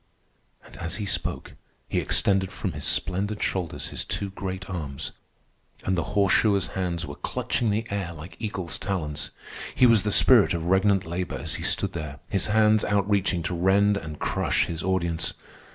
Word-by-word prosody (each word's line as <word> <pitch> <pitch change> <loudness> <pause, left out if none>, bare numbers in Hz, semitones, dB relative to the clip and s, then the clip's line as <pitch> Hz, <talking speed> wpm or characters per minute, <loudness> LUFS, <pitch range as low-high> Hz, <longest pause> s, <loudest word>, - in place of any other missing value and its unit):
'" - - -32
And - - -14
as 85 0 -3
he 105 - -4
spoke 100 - -3 0.3
he - - 0
extended 95 -1 +2
from 95 -2 -3
his 75 -1 -5
splendid 100 +7 0
shoulders 90 -4 -2
his - - -1
two 100 -1 -3
great 95 -1 -5
arms, 75 -8 -4 0.7
and 95 - +1
the 85 +3 -3
horseshoer's 100 0 +3
hands 85 -3 -2
were 70 - -7
clutching 115 +9 -2
the 110 +3 0
air 100 -4 -2
like 85 +2 -10
eagle's 95 - -3
talons. 75 -7 -2 0.5
He 125 - +5
was 115 -4 +6
the 105 - -1
spirit 110 -7 +6
of 85 -1 -3
regnant 95 +1 +3
labor 90 +2 -3
as - - -3
he - - -5
stood - - 0
there, 75 -4 -5
his 95 0 +3
hands 110 0 +4
outreaching 100 -3 +1
to 90 - -2
rend 95 +4 +3
and 80 -6 -5
crush - - 0
his 85 -1 -4
audience. 85 -3 0
95 Hz, 175 wpm, -26 LUFS, 85-100 Hz, 0.7 s, was